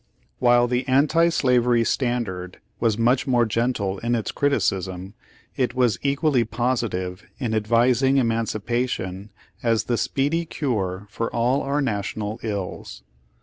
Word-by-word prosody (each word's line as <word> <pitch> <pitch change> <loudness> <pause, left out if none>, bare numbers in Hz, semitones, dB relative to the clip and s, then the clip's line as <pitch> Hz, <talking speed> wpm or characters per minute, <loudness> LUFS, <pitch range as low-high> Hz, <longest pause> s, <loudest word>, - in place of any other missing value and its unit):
While 120 0 +4
the 125 +1 -1
Anti 155 +6 +4
Slavery 125 -6 +3
Standard 110 -8 -2 0.2
was 115 -3 +1
much 120 +4 +2
more 120 -2 +3
gentle 110 -4 -1
in 120 +1 0
its 115 - -2
criticism, 95 -9 -1 0.4
it 125 -2 -1
was 125 -3 +2
equally 140 -2 +2
positive 110 -7 -2
in 120 -5 -2
advising 120 +5 +3
Emancipation 115 -4 -1 0.3
as 115 -2 +1
the 120 - -1
speedy 145 +5 0
cure 105 - -2
for 115 - -2
all 120 +4 +1
our 140 +2 -1
National 105 -2 -3
ills. 100 - -5
120 Hz, 125 wpm, -23 LUFS, 105-130 Hz, 0.4 s, While